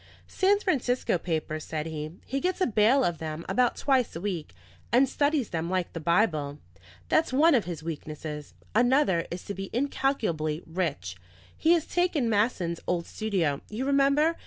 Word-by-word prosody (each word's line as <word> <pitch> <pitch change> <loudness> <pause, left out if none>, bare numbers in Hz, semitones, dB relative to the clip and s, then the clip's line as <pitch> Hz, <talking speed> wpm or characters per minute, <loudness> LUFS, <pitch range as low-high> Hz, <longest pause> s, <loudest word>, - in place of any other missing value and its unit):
"San 400 +1 +2
Francisco 255 - 0
papers," 155 -2 -3
said 155 -1 -4
he. 155 -1 -5
"He 275 - -2
gets 365 +5 -1
a 370 - +3
bale 230 +4 +4
of 175 -7 0
them 155 0 -5
about 250 -1 +2
twice 265 - +1
a - - -4
week, 175 - -4 0.4
and 255 +3 +5
studies 285 -2 +1
them 165 0 -2
like 185 -1 -1
the 165 - -4
Bible. 155 -4 +1 0.5
That's 320 -3 +3
one 305 +5 +5
of 240 -6 +3
his 170 -3 -6
weaknesses; 155 -2 -6 0.2
another 240 - +3
is 175 +1 -6
to 200 - -4
be 195 -1 -6
incalculably 215 - -1
rich. 150 - -3 0.4
He 330 - +4
has 335 -3 +1
taken 340 -10 +1
Masson's 200 -6 +1
old 175 -1 0
studio 180 -10 -1
you 225 +5 -3
remember? 280 +4 +3
200 Hz, 165 wpm, -27 LUFS, 160-270 Hz, 0.5 s, and